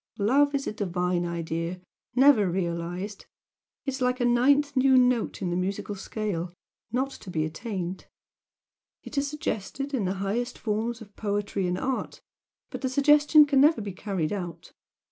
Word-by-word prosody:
Love 280 +8 +3
is 275 - -1
a - - -3
divine 180 -3 -1
idea, 170 +1 -3 0.4
never 255 -7 +6
realised. 175 +3 -3 0.6
It 275 - -1
is 265 - -6
like 250 0 +1
a 245 - +1
ninth 280 +4 +3
new 260 0 +5
note 250 -5 +2
in 175 - -1
the - - -1
musical 195 +3 -2
scale 195 -3 -4 0.4
not 260 +3 0
to 200 - -11
be 155 -3 0
attained. 185 +1 -5 1.0
It - - -9
is 280 - -1
suggested 280 -2 -4
in 235 -7 0
the 185 +2 -1
highest 220 +6 -2
forms 225 +2 -2
of 205 -2 -13
poetry 205 -2 -1
and 180 0 -1
art, 260 +5 -3 0.5
but - - -6
the 260 - 0
suggestion 295 +3 +6
can 280 -2 +3
never 300 0 +5
be 205 -3 -5
carried 190 -3 -2
out. 175 -4 -6
210 Hz, 165 wpm, -27 LUFS, 180-265 Hz, 1.0 s, never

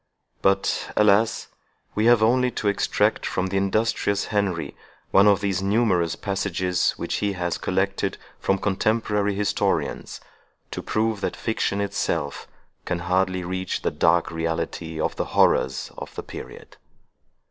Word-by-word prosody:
But, 95 0 +1
alas! 105 +1 +3 0.4
we 105 - +1
have 120 -2 +6
only 125 +3 +3
to 110 - -3
extract 100 - +1
from 95 - -1
the 95 - -1
industrious 100 +1 +1
Henry 100 -5 -1 0.4
one 100 +1 +6
of 100 -1 +4
those 95 -2 0
numerous 95 -5 +2
passages 95 -2 0
which - - -2
he 100 -1 0
has 85 -2 -2
collected - - -1 0.2
from 95 - +1
contemporary 105 +1 0
historians, 105 0 -1 0.5
to - - -4
prove 110 -1 -1
that - - -2
fiction 110 -3 -1
itself 100 0 -2 0.4
can 90 - -2
hardly 90 +1 0
reach 95 +1 -3
the - - +1
dark 80 +3 +2
reality 80 0 -3
of - - -1
the - - -1
horrors 65 0 +3
of - - -9
the - - -5
period. - - -10
100 Hz, 135 wpm, -24 LUFS, 90-105 Hz, 0.5 s, have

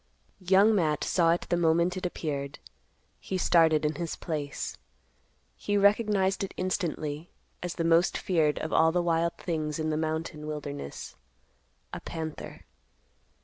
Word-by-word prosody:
Young 195 +4 +5
Matt 155 -7 +1
saw 170 -2 +2
it 170 - 0
the - - +2
moment 170 +1 +2
it 185 -1 -2
appeared. 140 -5 -4 0.6
He 190 - -3
started 160 -4 +4
in 150 - +1
his 170 - -3
place. 150 -4 -4 0.8
He 205 0 -1
recognized 200 -2 +3
it 195 - -5
instantly 165 -4 -2 0.3
as 180 -1 -4
the 165 - -1
most 165 +2 +3
feared 160 -5 +1
of 160 - -4
all 160 0 +5
the 175 - +1
wild 170 0 +1
things 155 -3 -2
in 155 -1 -1
the 155 - 0
mountain 155 -1 -3
wilderness—a 145 - -9
panther. 160 -2 -6
165 Hz, 140 wpm, -28 LUFS, 155-180 Hz, 0.8 s, Young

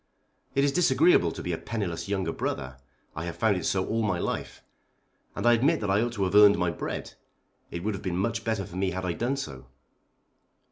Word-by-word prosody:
It 140 - +3
is 140 - +3
disagreeable 320 - +4
to - - -7
be - - -2
a - - -3
penniless 100 -8 -4
younger 95 -2 -1
brother. 65 -1 -4 0.4
I 80 - -4
have 85 - -5
found 110 -4 +2
it 90 - -2
so 95 -1 +1
all 115 0 -1
my 100 -5 0
life. - - -4 0.7
And - - -3
I 120 - +7
admit 140 +8 +3
that 100 -2 0
I 100 +2 +3
ought 120 0 -1
to 100 -4 -1
have 95 0 -1
earned 105 0 +7
my 90 -2 +1
bread. 85 - -5 0.6
It 85 - -6
would 110 +1 -1
have 95 - -6
been 90 -3 -2
much 115 +4 -1
better 110 -4 -1
for 90 - -9
me 95 0 +1
had 95 0 -4
I 90 - -1
done 125 +8 -1
so. 70 - -7
100 Hz, 225 wpm, -27 LUFS, 90-115 Hz, 0.7 s, I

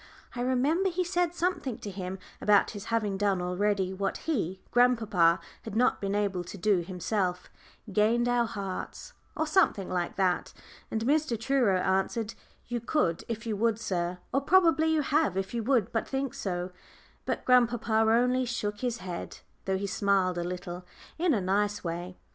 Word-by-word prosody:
I 245 - -3
remember 275 +10 +2
he 365 +1 -1
said 350 -1 0
something 340 -9 -1
to 205 - -7
him 185 0 -5 0.2
about 205 -1 +4
his 205 -1 -8
having 215 -4 0
done 200 -2 +2
already 190 +1 0
what 195 +1 -2
he 195 - -1
grandpapa 220 -9 +4 0.2
had 220 -2 -7
not 250 +3 +2
been 200 0 -1
able 200 -3 0
to 175 +3 -9
do 200 +1 +3
himself 180 +1 -2 0.4
"gained 230 +4 +3
our 245 -1 +2
hearts," 200 - -6 0.2
or 315 - +1
something 305 - +2
like 175 -1 -1
that. 185 -2 0 0.4
And 220 - -2
Mr. 290 -4 +1
Truro 235 -5 +2
answered. 195 +4 0 0.3
"You 240 0 -3
could 220 - 0
if 230 0 -4
you 220 -2 -1
would, 225 0 +1
sir, 180 -4 -2 0.2
or 275 - +2
probably 330 0 +4
you 315 -2 +2
have 290 - +1
if 195 +2 -2
you 235 - -1
would 245 -6 +2
but 225 - -1
think 270 -1 -2
so." 180 -1 -3 0.5
But - - -2
grandpapa 240 -3 +3
only 235 +4 +3
shook 210 -4 -3
his 245 -1 -1
head, 175 -2 -6 0.2
though 190 0 0
he 200 - -3
smiled 190 -2 +1
a - - -1
little 180 0 -5 0.4
in 340 -5 +3
a 205 - 0
nice 205 +2 0
way. 175 +1 -5
210 Hz, 170 wpm, -29 LUFS, 190-250 Hz, 0.5 s, about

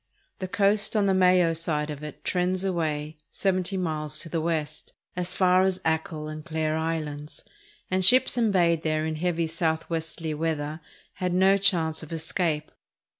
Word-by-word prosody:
The 185 - -3
coast 200 +3 +2
on 210 -2 +3
the 195 - +3
Mayo 180 -2 +4
side 155 -2 -1
of 150 0 -8
it 150 -2 -9
trends 185 +1 0
away 155 -4 -2
seventy 190 0 0
miles 155 -4 -1
to 165 - -5
the 165 0 -1
west, 155 -2 -3 0.2
as 180 0 -3
far 185 -1 +4
as 190 -1 +1
Achill 160 -1 -1
and 155 0 -7
Clare 155 -1 -1
Islands, 155 -2 -4 0.5
and 185 0 +2
sjiips 245 +9 +5
embayed 180 -8 +2
there 155 -1 0
in 160 -1 -2
heavy 170 0 0
southwesterly 160 0 -2
weather 155 -1 -2 0.3
had 180 -1 -2
no 190 +2 +5
chance 175 -5 +1
of 160 - -10
escape. 160 -1 -1
165 Hz, 160 wpm, -26 LUFS, 155-185 Hz, 0.5 s, sjiips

